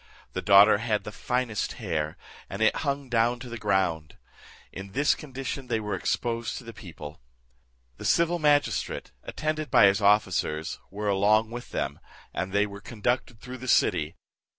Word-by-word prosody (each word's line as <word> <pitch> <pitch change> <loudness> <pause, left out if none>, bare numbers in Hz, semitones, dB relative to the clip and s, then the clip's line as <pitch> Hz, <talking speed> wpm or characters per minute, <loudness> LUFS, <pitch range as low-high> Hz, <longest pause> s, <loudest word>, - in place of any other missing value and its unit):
The - - -2
daughter 100 +1 +7
had 110 -2 -1
the 105 - -7
finest 125 -2 -2
hair, 75 -1 -3 0.3
and 100 +3 -2
it 110 - +3
hung 140 -2 -2
down 120 0 +1
to 125 - -8
the 120 - -6
ground. 90 -7 0 0.5
In 95 0 -9
this 145 +2 +3
condition 135 -2 -6
they 115 -2 0
were 105 -1 -4
exposed 115 -1 -2
to - - -8
the 115 -1 -9
people. 80 - -10 0.8
The - - -8
civil 170 +1 +2
magistrate, 145 -2 +1
attended 155 -1 -3
by 105 - +6
his 100 +2 +3
officers, 100 -6 +1
were 105 +1 -4
along 105 +3 +3
with 120 0 -7
them, 70 +1 -3 0.3
and 95 - -3
they 100 +1 +3
were 100 -1 -9
conducted 120 +1 -2
through 125 0 -8
the 130 - -8
city. 75 -9 +2
110 Hz, 165 wpm, -27 LUFS, 100-125 Hz, 0.8 s, daughter